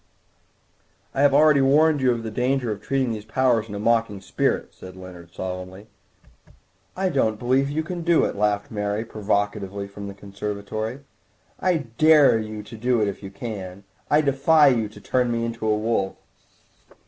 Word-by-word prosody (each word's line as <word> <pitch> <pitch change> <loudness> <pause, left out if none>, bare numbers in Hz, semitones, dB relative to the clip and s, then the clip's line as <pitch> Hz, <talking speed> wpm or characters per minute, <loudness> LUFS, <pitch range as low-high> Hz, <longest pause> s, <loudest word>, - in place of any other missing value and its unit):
"I 135 - 0
have 145 -1 +5
already 150 0 +5
warned 150 +2 +4
you 130 -1 +3
of 115 -1 -2
the 110 - -5
danger 125 +1 0
of 100 -1 -5
treating 135 -1 -1
these 110 -2 -5
powers 115 -1 +1
in 105 - -6
a - - -4
mocking 115 -2 +1
spirit," - - -1
said 90 0 -12
Leonard 90 -2 -12
solemnly. 95 +3 -7 1.1
"I 190 0 +1
don't 110 -9 +1
believe 130 +4 +1
you 155 +2 -2
can 175 +2 -5
do 170 0 +3
it," - - -3
laughed 105 0 0
Mary 105 +1 -2
provocatively 100 -2 -2
from 100 0 -9
the 100 - -8
conservatory; 105 +4 -5 0.6
"I 170 -6 0
dare 155 -7 +6
you 110 -1 -6
to 115 - -11
do 120 +2 +1
it 105 - +1
if 100 - -5
you 95 - -7
can. 100 -2 -7 0.3
I 150 - +4
defy 145 +1 +4
you 115 -5 0
to 105 - -14
turn 125 -1 0
me 115 0 -1
into 115 -1 -4
a 105 0 +2
wolf." 105 -3 -1
110 Hz, 175 wpm, -23 LUFS, 100-135 Hz, 1.1 s, dare